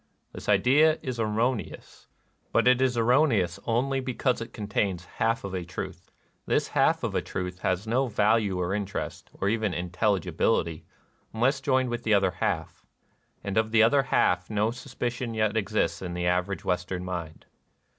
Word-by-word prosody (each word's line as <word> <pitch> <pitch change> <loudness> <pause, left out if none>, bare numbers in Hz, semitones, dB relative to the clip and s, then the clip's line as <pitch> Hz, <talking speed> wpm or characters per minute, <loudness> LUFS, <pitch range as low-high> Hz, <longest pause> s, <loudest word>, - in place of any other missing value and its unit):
This - - -7
idea 150 +5 +4
is 130 -3 -4
erroneous. 115 +2 -2 0.4
But - - +3
it 125 0 +5
is 130 -2 +2
erroneous 115 - +3
only 130 +4 +1
because 125 -1 -1
it 115 - -6
contains 100 -4 -2
half 115 +4 -1
of 100 -1 -5
a 90 -2 -2
truth. 90 - -7 0.4
This - - +1
half - - +2
of - - -1
a - - +1
truth 90 -1 -5
has 95 +2 -1
no 125 +4 +1
value 105 -3 +2
or 90 +1 -1
interest, 100 -1 -4
or 100 - -3
even 110 -4 0
intelligibility, 90 -2 0 0.5
unless 135 +5 +2
joined 130 -2 +1
with 120 0 -2
the 110 -2 +3
other 95 -2 +3
half. 90 - -3 0.6
And 100 0 -3
of 110 0 +2
the 110 0 +5
other 140 +5 +5
half 90 -8 +1
no 105 +1 +1
suspicion 120 -1 -4
yet 110 -1 +1
exists 105 -4 0
in 90 -2 -5
the 90 0 -2
average 90 +2 0
Western 90 0 -2
mind. 85 -3 -6
110 Hz, 165 wpm, -27 LUFS, 90-120 Hz, 0.6 s, it